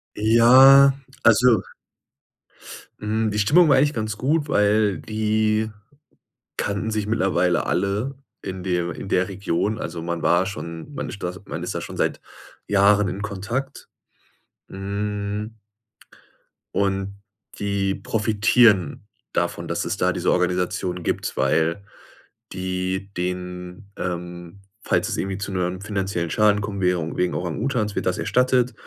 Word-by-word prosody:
Ja, 130 Hz, +5 st, +7 dB, 0.3 s
also 120 Hz, 0 st, +5 dB, 1.4 s
Hm, 110 Hz, 0 st, -1 dB
die 105 Hz, -, -1 dB
Stimmung 155 Hz, -, +5 dB
war 140 Hz, -, +5 dB
eigentlich 145 Hz, +2 st, +3 dB
ganz 110 Hz, -2 st, -3 dB
gut, 145 Hz, +4 st, 0 dB
weil 105 Hz, -3 st, +2 dB
die 110 Hz, 0 st, 0 dB, 0.9 s
kannten 105 Hz, +2 st, -2 dB
sich 105 Hz, -1 st, -1 dB
mittlerweile 90 Hz, -4 st, +1 dB
alle 100 Hz, +9 st, -1 dB, 0.3 s
in 95 Hz, -1 st, -6 dB
de 90 Hz, -2 st, -1 dB
in 95 Hz, -, -7 dB
der 90 Hz, 0 st, +2 dB
Region. 100 Hz, +2 st, -2 dB
Also, 85 Hz, -, -5 dB
man 85 Hz, 0 st, -3 dB
war 85 Hz, +2 st, +3 dB
schon 85 Hz, -, -7 dB
man -, -, -5 dB
stas 95 Hz, -3 st, -6 dB
man -, -, -6 dB
ist -, -, -4 dB
da -, -, -2 dB
schon -, -, -8 dB
seit -, -, -1 dB, 0.5 s
Jahren 100 Hz, 0 st, +4 dB
in 100 Hz, +2 st, -4 dB
Kontakt. 115 Hz, +8 st, -4 dB, 0.8 s
Hm 105 Hz, +2 st, -4 dB, 1.2 s
und 100 Hz, 0 st, -1 dB, 0.4 s
die 100 Hz, -1 st, 0 dB
profitieren 105 Hz, -4 st, +2 dB, 0.2 s
davon, -, -, -2 dB
dass -, -, -2 dB
es -, -, -2 dB
da -, -, +2 dB
diese -, -, 0 dB
Organisation 90 Hz, 0 st, -1 dB
gibt, -, -, -2 dB
weil 85 Hz, +4 st, +1 dB, 0.7 s
die 95 Hz, +1 st, -3 dB
denen 90 Hz, +2 st, -5 dB
ähm, 90 Hz, +1 st, -6 dB, 0.2 s
falls -, -, +1 dB
es -, -, -2 dB
irgendwie 95 Hz, 0 st, -2 dB
zu 100 Hz, 0 st, -5 dB
‘nem 90 Hz, 0 st, -2 dB
finanziellen 95 Hz, -5 st, -2 dB
Schaden 105 Hz, -1 st, +3 dB
kommen 100 Hz, -1 st, -4 dB
wäre, 90 Hz, -3 st, 0 dB
wegen 90 Hz, 0 st, 0 dB
Orang 85 Hz, -1 st, -3 dB
Utans, 110 Hz, -6 st, -1 dB
wird -, -, -2 dB
das 90 Hz, -, 0 dB
erstattet. 125 Hz, -1 st, +2 dB
100 Hz, 135 wpm, -23 LUFS, 90-110 Hz, 1.4 s, Ja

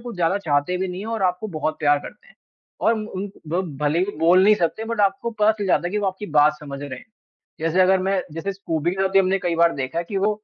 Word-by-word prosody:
कुछ 240 Hz, 0 st, -7 dB
ज़्यादा 180 Hz, +3 st, +1 dB
चाहते 150 Hz, -1 st, 0 dB
भी 190 Hz, +1 st, -2 dB
नहीं 180 Hz, +1 st, -6 dB
है -, -, -7 dB
और 220 Hz, -, -3 dB
आपको 185 Hz, +4 st, 0 dB
बहुत 155 Hz, 0 st, -2 dB
प्यार 145 Hz, -1 st, +4 dB
करते 470 Hz, -, -12 dB
हैं -, -, -22 dB, 0.4 s
और 230 Hz, -, +3 dB
उन 205 Hz, -2 st, -5 dB, 0.2 s
ब 175 Hz, +4 st, 0 dB, 0.2 s
भले 150 Hz, +3 st, +2 dB
ही 195 Hz, +3 st, -1 dB
बोल 175 Hz, +3 st, +5 dB
नहीं 210 Hz, +1 st, +6 dB
सकते, 190 Hz, +4 st, -1 dB
बट 230 Hz, -1 st, -2 dB
आपको 220 Hz, +5 st, +1 dB
पता 215 Hz, -1 st, +3 dB
चल 210 Hz, -2 st, -4 dB
जाता 175 Hz, -1 st, +2 dB
है -, -, -3 dB
कि 210 Hz, -, 0 dB
वो 205 Hz, -, -1 dB
आपकी 190 Hz, +2 st, -4 dB
बात 150 Hz, +1 st, +6 dB
समझ 140 Hz, -2 st, -7 dB
रहे 130 Hz, -3 st, -6 dB
हैं। -, -, -15 dB, 0.5 s
जैसे 165 Hz, +3 st, +1 dB
अगर 190 Hz, +1 st, +4 dB
मैं 190 Hz, 0 st, +1 dB
जैसे 165 Hz, +5 st, -3 dB
स्कूबी 170 Hz, -4 st, -2 dB
के 190 Hz, +1 st, -2 dB
साथ 195 Hz, -, +2 dB
भी 195 Hz, -, +5 dB
हमने 190 Hz, 0 st, +2 dB
कई 175 Hz, -2 st, -1 dB
बार 170 Hz, 0 st, +4 dB
देखा 135 Hz, +4 st, -3 dB
है 170 Hz, -, -2 dB
कि 200 Hz, -, -3 dB
वो 200 Hz, +2 st, +2 dB
185 Hz, 275 wpm, -22 LUFS, 165-205 Hz, 0.5 s, नहीं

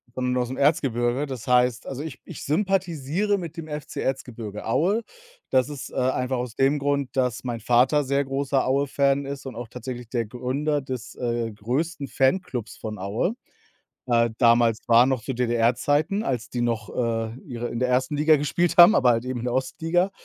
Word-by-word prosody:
sondern 125 Hz, 0 st, -1 dB
ausm 125 Hz, +1 st, -2 dB
Erzgebirge. 135 Hz, -3 st, +1 dB
Das 130 Hz, -4 st, -7 dB
heißt 125 Hz, -1 st, +2 dB
also, 135 Hz, +2 st, -5 dB
ich 140 Hz, -6 st, -7 dB
ich -, -, -8 dB
sympathisiere 180 Hz, +2 st, 0 dB
mit 170 Hz, -5 st, -7 dB
dem 165 Hz, -1 st, -6 dB
FC 150 Hz, -1 st, -6 dB
Erzgebirge 115 Hz, -6 st, -4 dB
Aue. 190 Hz, -, +1 dB, 0.5 s
Das 130 Hz, +2 st, +2 dB
ist, 145 Hz, -3 st, -7 dB
äh, -, -, -12 dB
einfach 130 Hz, 0 st, 0 dB
aus 120 Hz, -2 st, -4 dB
dem 135 Hz, +2 st, +3 dB
Grund, 140 Hz, -1 st, 0 dB
dass 125 Hz, -2 st, 0 dB
mein 115 Hz, -2 st, -3 dB
Vater 125 Hz, +6 st, +3 dB
sehr 140 Hz, +1 st, +1 dB
großer 135 Hz, 0 st, 0 dB
Aue-Fan 140 Hz, +1 st, +2 dB
ist 140 Hz, 0 st, -6 dB
und 130 Hz, -3 st, -7 dB
auch 120 Hz, 0 st, -7 dB
tatsächlich 125 Hz, -1 st, -7 dB
der 120 Hz, -2 st, -1 dB
Gründer 135 Hz, +6 st, -2 dB
des, 130 Hz, -3 st, -6 dB
äh, 120 Hz, -2 st, -2 dB
größten 140 Hz, +8 st, -2 dB
Fanklubs 130 Hz, -, 0 dB
von 110 Hz, -1 st, -6 dB
Aue. 105 Hz, -, -1 dB, 0.7 s
Äh, 120 Hz, -1 st, +3 dB
damals 115 Hz, -2 st, +4 dB
war 120 Hz, +1 st, +7 dB
noch 130 Hz, -3 st, 0 dB
zu 135 Hz, +3 st, -4 dB
DDR 120 Hz, -1 st, +2 dB
Zeiten, 155 Hz, -, +1 dB
als 120 Hz, -4 st, -2 dB
die 120 Hz, -, -2 dB
noch, 115 Hz, -3 st, -1 dB
äh, 115 Hz, -1 st, -1 dB
ihre 120 Hz, -2 st, -4 dB
in 120 Hz, -, -4 dB
der 125 Hz, -, +1 dB
1. 130 Hz, +3 st, +1 dB
Liga 155 Hz, +2 st, +5 dB
gespielt 155 Hz, +4 st, 0 dB
haben, 175 Hz, +5 st, +10 dB
aber 125 Hz, -2 st, +4 dB
halt 115 Hz, +1 st, -1 dB
eben 130 Hz, -1 st, -3 dB
in 120 Hz, -, -6 dB
der 120 Hz, -, -1 dB
Ostliga 165 Hz, +8 st, 0 dB
130 Hz, 185 wpm, -24 LUFS, 120-145 Hz, 0.7 s, haben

